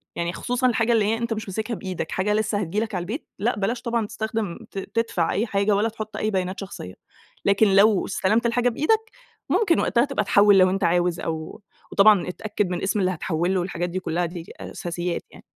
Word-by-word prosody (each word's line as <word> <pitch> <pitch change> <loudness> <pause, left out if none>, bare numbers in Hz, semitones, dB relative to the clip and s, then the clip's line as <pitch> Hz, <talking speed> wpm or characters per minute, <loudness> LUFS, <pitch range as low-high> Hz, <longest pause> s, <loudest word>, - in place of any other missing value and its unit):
يعني 170 0 -2
خصوصًا 250 +5 0
الحاجة 230 -1 +2
اللي 220 -2 +3
هي 225 +2 +1
أنت 235 0 -2
مش 215 -2 -5
ماسكها 220 +4 -3
بإيدك، 185 -6 -5
حاجة 200 +2 0
لسه 215 -1 0
هتيجي 200 +2 -1
لك 220 -3 -3
على 175 - -1
البيت، 220 - -5
لأ 235 +5 +1
بلاش 235 +5 -1
طبعًا 235 -2 -1
تستخدِم 220 -5 -3
ت 195 - -4
تدفع 225 -5 -1
أي 215 +4 0
حاجة 200 0 +1
ولا 215 +3 +1
تحُط 215 -1 -7
أي 215 0 -1
بيانات 185 0 -2
شخصية، 190 - -7 0.5
لكن 200 +2 +4
لو 200 0 +5
استلمت 215 +4 +1
الحاجة 245 +1 +2
بإيدك 440 - 0 0.4
ممكن 350 -7 +3
وقتها 235 +2 +2
تبقى 275 -7 -1
تحوّل 200 0 +5
لو 185 0 +6
أنت 195 +1 -1
عاوز 175 0 +2
أو 160 +2 -5 0.3
وطبعًا 205 -2 +5
اتأكّد 205 0 -2
من 180 - -3
اسم 195 +2 0
اللي 185 -1 +2
هتحوّل 175 +1 -1
له 185 - +1
والحاجات 175 -1 -2
دي 185 +2 -3
كلّها، 175 -1 -1
دي 170 -1 -8
أساسيات 175 0 -4
يعني. - - -15
200 Hz, 210 wpm, -24 LUFS, 180-225 Hz, 0.5 s, لو